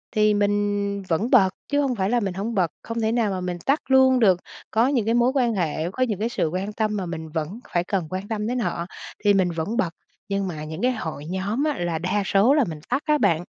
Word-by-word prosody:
thì 215 0 +4
mình 205 0 0
vẫn 190 +8 +1
bật 200 -8 +6 0.2
chứ 285 0 +2
hông 270 -3 0
phải 190 -2 0
là 245 +1 +2
mình 195 -5 -2
hổng 205 +5 -3
bật, 180 -5 +2
không 230 0 -3
thể 220 0 +1
nào 230 -3 +1
mà 185 -1 -3
mình 180 -1 -3
tắt 280 +3 +3
luôn 260 -1 +6
được. 190 -6 +4 0.3
Có 230 +3 +3
những 255 -6 +1
cái 225 - +2
mối 240 +1 +4
quan 245 -4 +2
hệ, 165 -2 -1
có 255 - 0
những 215 -6 -1
cái 225 +2 0
sự 200 - 0
quan 190 +4 -3
tâm 215 -1 -1
mà 190 - -2
mình 160 -2 -6
vẫn 160 +7 -4
phải 175 - +2
cần 180 -3 -2
quan 185 +3 -4
tâm 215 -1 -2
đến 250 +2 -1
họ, 170 -6 -2 0.4
thì 205 - +6
mình 185 -3 +2
vẫn 170 +8 -3
bật, 180 -9 +1 0.4
nhưng 195 -1 -1
mà 155 -4 -5
những 155 +1 -6
cái 250 +1 +3
hội 160 - -5
nhóm 190 - -2
á, 300 -2 0
là 170 -2 -1
đa 185 +4 0
số 200 +8 +4
là 295 -2 +4
mình 155 -2 -6
tắt 255 +3 +1
á 300 -1 +3
bạn. 165 - +2
205 Hz, 260 wpm, -24 LUFS, 180-235 Hz, 0.4 s, bật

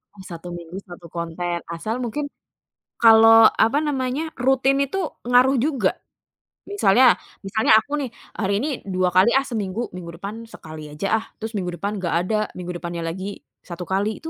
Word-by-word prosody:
Oh 195 - -12
1 170 +1 -8
minggu, 170 +1 -9
1 175 -3 -12
konten. 170 +1 -3 0.2
Asal 215 +8 -3
mungkin, 255 +4 -3 0.7
kalau 225 0 +8 0.2
apa 235 +6 +2
namanya, 270 +2 -1
rutin 265 +1 +2
itu 280 +8 -4 0.3
ngaruh 250 +3 +4
juga? 255 -6 +1 0.7
Misalnya 260 - +4 0.4
misalnya 220 +3 +1
aku 220 - -2
nih, 260 - -3 0.3
"Hari 200 -2 0
ini 265 +9 -1 0.3
2 185 0 +2
kali 185 +5 +6
ah 270 - +2
seminggu, 215 -2 -3
minggu 175 -2 -7
depan 200 +3 -6 0.2
sekali 155 -1 -10
aja 150 +7 -3
ah," - - -12
terus 220 +1 -6
minggu 185 -3 -2
depan 200 +3 -2
nggak 175 -3 -2
ada, 215 +3 0 0.2
minggu 180 -1 -5
depannya 170 0 -5
lagi 185 +3 -6 0.4
1 175 0 -7
kali, 200 +4 -1
itu 325 - -8
210 Hz, 170 wpm, -22 LUFS, 180-250 Hz, 0.7 s, kalau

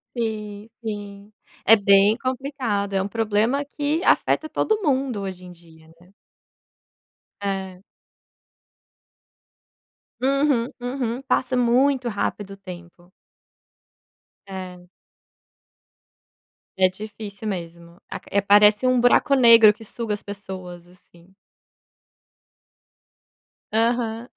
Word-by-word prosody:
Sim, 215 -2 -4 0.2
sim. 205 -1 -7 0.3
É 225 - +8
bem 200 +1 +4
complicado, 255 -6 -3
é 195 - +1
um 190 - -2
problema 225 +5 0
que 295 +3 0
afeta 310 - +2
todo 435 +5 0
mundo 265 - -1
hoje 190 -2 -7
em 180 - -11
dia, 165 -2 -19
né. 180 +2 -21 1.3
É. 190 -2 -4 2.4
Uhum, 275 -2 +1
uhum, 245 -1 -3
passa 260 -1 0
muito 250 +1 +2
rápido 205 -1 -3
o - - -12
tempo. 175 -2 -12 1.4
É. 180 -2 -8 1.9
É 185 - +6
difícil 205 +1 -8
mesmo. 170 -2 -7
Aq - - -9 0.2
parece 210 +3 +5
um 255 -1 +3
buraco 245 +3 +3
negro 230 -5 +7
que 225 - -14
suga 225 0 -5
as 205 - -5
pessoas 185 -3 -9
assim. 175 0 -23 2.4
Aham. 230 0 0
210 Hz, 95 wpm, -22 LUFS, 190-245 Hz, 2.4 s, É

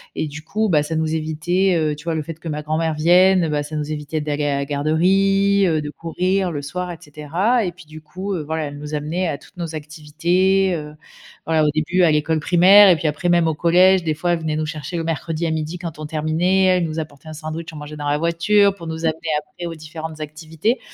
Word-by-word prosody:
Et 160 - -2
du 150 +1 -8
coup, 215 +7 -1
bah, 155 -7 +3
ça 150 +2 -3
nous 160 0 0
évitait 160 +4 0
heu, 155 -2 0
tu 150 +2 -14
vois 165 -1 -1
le 155 - -2
fait 165 +1 -8
que 165 - -9
ma 150 -1 -3
grand-mère 155 +1 -1
vienne, 180 +2 +4
bah, 150 -1 0
ça 145 +2 -7
nous 150 0 -3
évitait 150 +1 -3
d'aller 150 -1 -2
à 145 -1 +1
la 140 - -2
garderie, 195 +7 +2
heu, 160 -2 +1
de 150 -1 -5
courir 180 +4 -1
le 145 -3 -4
soir 180 +5 -4
et 170 - -7
cetera. 175 - -1
Et 180 - -2
puis 175 0 -16
du 155 +1 -12
coup, 185 +6 -5
heu, 175 - -2
voilà, 160 +1 -3
elle 145 0 -7
nous 150 +1 -5
amenait 160 +5 -2
à 145 - -2
toutes 180 - -20
nos 165 -2 -5
activités, 170 +6 0
heu. 150 -1 -7 0.5
Voilà, 160 -1 +2
au - - +3
début 175 +4 +1
à 165 - +5
l'école 155 +1 +1
primaire, 185 +5 +7
et 180 - +6
puis 160 - -6
après 150 +4 -3
même 170 -2 +3
au - - 0
collège, 180 +3 +4
des 155 - +1
fois 175 +3 -1
elle 170 - +1
venait 160 -1 -2
nous 155 0 -1
chercher 155 +2 -6
le 165 - -1
mercredi 165 +1 -2
à 160 - 0
12:00 160 +2 -3
quand 170 -3 -7
on 155 - -5
terminait, 160 +5 +1
elle 180 -2 +3
nous 160 -1 -5
apportait 155 -1 -8
un 155 - -7
sandwich 155 +1 -6
on - - -10
mangeait 150 0 -8
dans 145 -1 -4
la 145 0 +1
voiture, 185 +5 +3
pour 170 -4 -10
nous 160 0 -5
amener 160 -1 0 0.2
après 150 +3 -10
aux 170 -1 -5
différentes 155 0 -8
activités. 160 - -2
160 Hz, 250 wpm, -20 LUFS, 150-180 Hz, 0.5 s, primaire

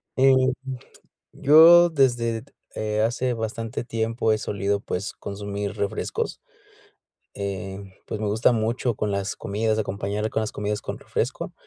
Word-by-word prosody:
eh, 135 0 +5 1.0
yo 165 +4 +8
desde, 120 -7 +1 0.3
eh, 105 0 -1
hace 120 +3 +1
bastante 115 +1 -4
tiempo 115 -1 0
he - - -2
solido, 100 -1 -1
pues, 100 0 -4
consumir 100 0 -5
refrescos, 100 - -3 0.9
eh, 100 -1 -4 0.3
pues, - - -4
me 110 - -1
gusta 110 +4 +3
mucho 115 0 0
con 105 -1 -1
las 100 -1 -2
comidas, 110 +2 -1
acompañar 100 +1 -2
con - - -1
las 110 - -2
comidas 105 0 -3
con - - -5
refresco - - -3
110 Hz, 135 wpm, -24 LUFS, 100-115 Hz, 1.0 s, yo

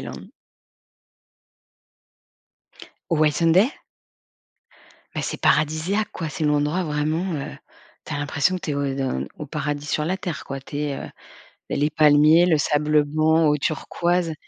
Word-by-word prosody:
Island. - - -9 2.8
Whitsunday? 165 - +3 1.4
Mais - - -2
c'est - - -4
paradisiaque 155 +7 +1
quoi! 165 -3 -4
C'est 160 0 -4
l'endroit 150 +4 +1
vraiment, 155 +4 -1
heu, 140 - -5 0.5
tu 155 - -4
as 145 - -2
l'impression 145 +5 0
que - - -7
tu 155 - -3
es - - -1
au 140 0 -1
de 130 - -2
au 150 - -6
paradis 145 0 -3
sur 150 +1 -1
la 185 - 0
terre 170 -9 -5
quoi. 135 - -5
Tu 145 +2 -7
es 145 -2 -2
heu, - - -7 0.6
les 145 +2 +1
palmiers, 155 +2 +5
le 165 -4 +3
sable 150 0 +2
blanc, 155 +2 +2
eau 150 0 +3
turquoise 170 +3 -1
150 Hz, 140 wpm, -23 LUFS, 145-165 Hz, 2.8 s, palmiers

